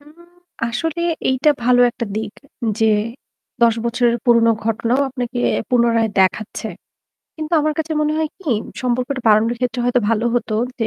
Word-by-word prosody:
হুম, 295 +1 -18 0.6
আসলে 325 +7 -3 0.3
এইটা 260 +3 +3
ভালো 245 0 +4
একটা 235 - -5
দিক 220 -1 -3 0.5
যে 225 - +3 0.8
১০ 230 -1 +5
বছরের 235 0 +1
পুরোনো 235 -2 +5
ঘটনাও 230 +3 0
আপনাকে 245 -1 -4 0.3
পুনরায় 235 -2 +3
দেখাচ্ছে। 195 +3 0 0.7
কিন্তু 310 +1 -6
আমার 305 +1 +1
কাছে 320 0 -2
মনে 300 0 +1
হয় 315 -1 0
কি 320 - -3 0.3
সম্পর্কটা 255 +2 -1
বাড়ানোর 220 +3 +4
ক্ষেত্রে 245 -1 -1
হয়তো 245 0 +2
ভালো 230 0 +1
হতো 235 -2 -1 0.2
যে 225 - 0
245 Hz, 150 wpm, -19 LUFS, 230-265 Hz, 0.8 s, ১০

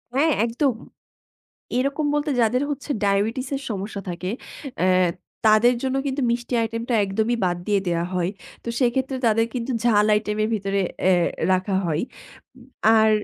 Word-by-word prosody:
হ্যাঁ, 310 +3 +3
একদম। 245 +3 +1 1.1
এরকম 280 +3 0
বলতে 295 0 0
যাদের 240 +4 +2
হচ্ছে 290 +1 -5
ডায়াবেটিসের 225 +8 0
সমস্যা 200 0 -4
থাকে, 180 +2 -4 0.5
অ্যা 185 - +3 0.6
তাদের 220 +3 +5
জন্য 265 0 0
কিন্তু 270 0 -1
মিষ্টি 240 +1 -2
আইটেমটা 230 +2 -2
একদমই 220 +5 0
বাদ 175 -1 +1
দিয়ে 205 -2 +2
দেয়া 170 0 0
হয়। 180 0 0 0.3
তো - - -5
সেক্ষেত্রে 260 +2 +1
তাদের 225 +1 +3
কিন্তু 245 +1 -3
ঝাল 210 -3 +4
আইটেমের 215 0 0
ভিতরে 195 -1 -1 0.2
অ্যা 185 0 +5 0.4
রাখা 185 +1 +1
হয়। 160 0 0 0.6
উম 245 - -16 0.3
আর 220 0 +5
225 Hz, 145 wpm, -23 LUFS, 200-255 Hz, 1.1 s, তাদের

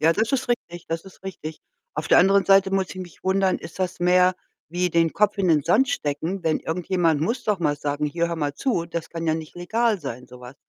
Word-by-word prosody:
Ja, 160 +2 +5
das 220 +6 0
ist 260 -2 0
richtig, 175 -8 -3
das 165 0 -3
ist 190 -1 -15
richtig. 160 -5 -7 0.3
Auf 150 0 -3
der - - +6
anderen 195 +2 +5
Seite 195 -1 +5
muss 190 -1 0
ich - - -9
mich 175 -3 -11
wundern, 190 0 +2
ist 165 - -11
das 185 -1 -2
mehr 180 +1 +4 0.3
wie 180 +2 -1
den 165 -1 +2
Kopf 210 0 +1
in 190 -2 +2
den 155 -3 +4
Sand 215 - +3
stecken, 175 - -2
wenn 160 -1 +2
irgendjemand 165 -2 0
muss 230 +9 -1
doch 210 -2 +1
mal 150 -4 0
sagen: 145 +1 -2
„Hier 170 +3 -1
hör 170 - -3
mal 145 -2 -2
zu, 220 - -1
das 170 -1 -5
kann 165 0 -4
ja 160 - +2
nicht 160 -1 -7
legal 220 +4 0
sein, 125 -3 -6
so 125 0 -14
was.“ 125 +2 -11
175 Hz, 240 wpm, -24 LUFS, 160-195 Hz, 0.3 s, der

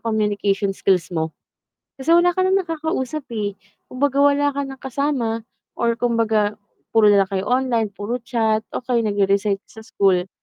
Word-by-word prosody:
communication 205 -3 0
skills 185 -2 0
mo 160 -1 -1 0.7
kasi 275 +5 0
wala 345 +1 +4
ka 370 - +2
ng 380 +1 +3
nakakausap, 315 -4 -3
eh. 205 -3 -3 0.3
Kumbaga 280 +2 0
wala 285 0 +3
ka 280 - -3
ng 270 - -8
kasama 260 -4 -1 0.4
or 235 -1 +1
kumbaga 220 -3 +1 0.3
puro 220 -2 +5
na 200 -1 +5
lang 190 - -18
kayo 190 0 -1
online, 245 -3 +1
puro 205 +5 -4
chat, 225 -2 0 0.2
okey 245 -1 0
nagre-research 200 -1 +1
sa 220 - -14
school 190 -4 +1
230 Hz, 155 wpm, -21 LUFS, 205-270 Hz, 0.7 s, puro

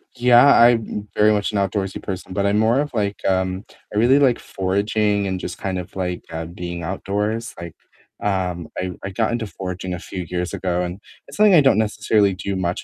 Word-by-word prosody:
Yeah, 120 +1 +6
I'm 120 -2 +5
m 105 0 -5
very 105 +1 +5
much 105 0 0
an - - 0
outdoorsy 100 -1 -2
person, 95 -1 -6
but 100 +1 0
I'm 100 +1 +2
more 115 +5 +3
of, 145 -3 -5
like, 105 -2 -2
um 95 0 0 0.3
I - - -2
really 125 +6 +5
like 130 -4 +3
foraging 100 +2 0
and 95 -1 -2
just - - -6
kind 95 -1 -3
of, 90 - -9
like, 90 -2 -3
uh, 80 0 -4
being 85 0 -6
outdoors, 105 +5 -3
like, 85 -2 -8 0.5
um, 90 -4 -1
I 90 0 -2
I 95 - -3
got 110 +4 -1
into 115 -2 -2
foraging 90 -2 -5
a 90 - -4
few 90 +1 -6
years 90 0 -3
ago, 90 -1 -1
and 90 +2 -5 0.3
it's - - -11
something 210 -3 +6
I 155 - +7
don't 135 -5 +4
necessarily 105 -2 +2
do 95 +2 -4
much 90 -1 -2
100 Hz, 210 wpm, -21 LUFS, 90-110 Hz, 0.5 s, I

